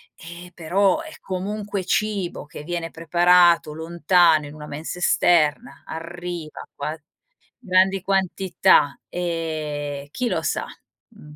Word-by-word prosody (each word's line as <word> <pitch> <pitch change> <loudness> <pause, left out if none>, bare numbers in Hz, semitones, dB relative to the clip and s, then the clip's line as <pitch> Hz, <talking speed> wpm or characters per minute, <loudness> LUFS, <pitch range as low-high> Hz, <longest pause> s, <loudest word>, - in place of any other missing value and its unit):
e 170 +1 -11
però 195 - +1
è 320 -1 -10
comunque 200 +1 -4
cibo 200 -4 -1
che 150 - -10
viene 170 0 -4
preparato 170 0 +4
lontano 165 0 +3
in 145 - -11
una 150 -1 -9
mensa 155 +5 -6
esterna 175 +4 +2
arriva 170 -1 -7
qua 150 +3 -4 0.7
grandi 190 +1 +3
quantità, 190 -5 +2
ehm, 155 -5 -3
chi 250 +7 -2
lo - - -1
sa, - - -1 0.4
mhmm, 150 -10 -15
175 Hz, 115 wpm, -23 LUFS, 155-190 Hz, 0.7 s, preparato